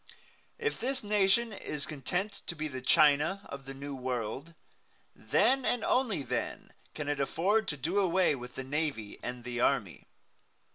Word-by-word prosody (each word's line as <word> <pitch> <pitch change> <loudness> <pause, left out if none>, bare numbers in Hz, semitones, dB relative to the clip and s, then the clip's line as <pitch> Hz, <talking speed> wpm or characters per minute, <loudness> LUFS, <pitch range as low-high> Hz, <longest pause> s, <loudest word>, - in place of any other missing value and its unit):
If 450 -1 -1
this 260 +1 -1
nation 210 +2 +3
is 150 -6 -3
content 180 +8 -3
to 170 - -3
be 155 0 -2
the 130 -3 -6
China 150 +8 +4
of 140 -1 -7
the 135 - -7
New 140 +1 -6
World, 130 +4 -4 0.6
then 240 - +2
and 245 -2 +1
then - - -1
only 240 - +2
can 125 +4 -5
it 145 -1 -1
afford 195 +10 +2
to 150 - -2
do 165 +9 0
away 185 -3 +3
with 125 -2 -7
the 130 - -4
navy 135 -6 -2
and 125 0 -5
the 120 0 -4
army. 115 -9 +1
150 Hz, 160 wpm, -31 LUFS, 130-200 Hz, 0.6 s, China